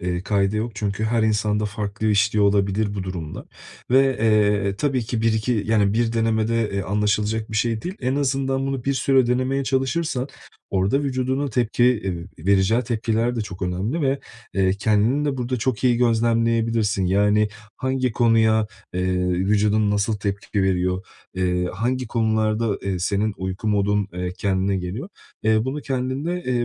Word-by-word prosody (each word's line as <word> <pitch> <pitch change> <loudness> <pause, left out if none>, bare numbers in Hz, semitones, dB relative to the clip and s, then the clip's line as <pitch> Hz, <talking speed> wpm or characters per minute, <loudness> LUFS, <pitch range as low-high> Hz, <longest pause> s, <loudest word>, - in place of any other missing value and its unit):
eee, 90 0 -2
kaide 100 +1 +1
yok, 115 +3 -1
çünkü 100 +1 -2
her 115 +1 +1
insanda 105 -1 +1
farklı 105 +1 -3
işliyor 105 0 +3
olabilir 100 +1 +1
bu 100 - -3
durumlar 90 -5 -6 0.4
ve, 130 +2 +6 0.2
eee, 105 -3 +2
tabii 135 +1 0
ki 115 0 -2
1-2, 110 0 +1
yani 105 -3 +2
1 115 +1 +1
denemede, 115 0 +1
eee, 100 0 -1
anlaşılacak 105 +2 0
bir 110 - -3
şey 115 0 0
değil. 180 +2 -4
En 130 0 0
azından 135 -1 0
bunu 135 -3 -3
bir 140 - +1
süre 135 -1 +3
denemeye 130 +3 0
çalışırsan 135 +1 -1 0.4
orada 100 +8 +1
vücudunun 130 +1 -1
tepki, 120 -1 +1
eee, 95 -8 -1
vereceği 100 +4 +3
tepkiler 115 0 -1
de - - -1
çok 95 -3 -7
önemli 95 - -2
ve, 135 0 +1 0.4
eee, 95 -1 +2
kendini 110 +8 +1
de 140 -2 -1
burada 125 0 -2
çok 125 +1 -2
iyi 125 -2 +4
gözlemleyebilirsin. 115 -3 +1
Yani, 105 +3 +3 0.3
hangi 130 -2 -1
konuya, 110 -2 +3 0.3
eee, 90 0 0
vücudun 105 +3 +2
nasıl 105 +1 0
tepki 100 0 -2
veriyor, 90 0 0 0.3
eee, 90 -1 0
hangi 125 +4 -1
konularda, 110 -1 0
eee, 95 -2 -2
senin 100 +4 0
uyku 95 +3 -3
modun, 105 -1 +1
eee, 90 0 -3
kendine 95 0 0
geliyor, 95 - -5 0.3
eee, 110 0 +2
bunu 135 +3 -3
kendinde, 135 +7 -2
eee, 125 -1 0
110 Hz, 160 wpm, -22 LUFS, 100-125 Hz, 0.4 s, ve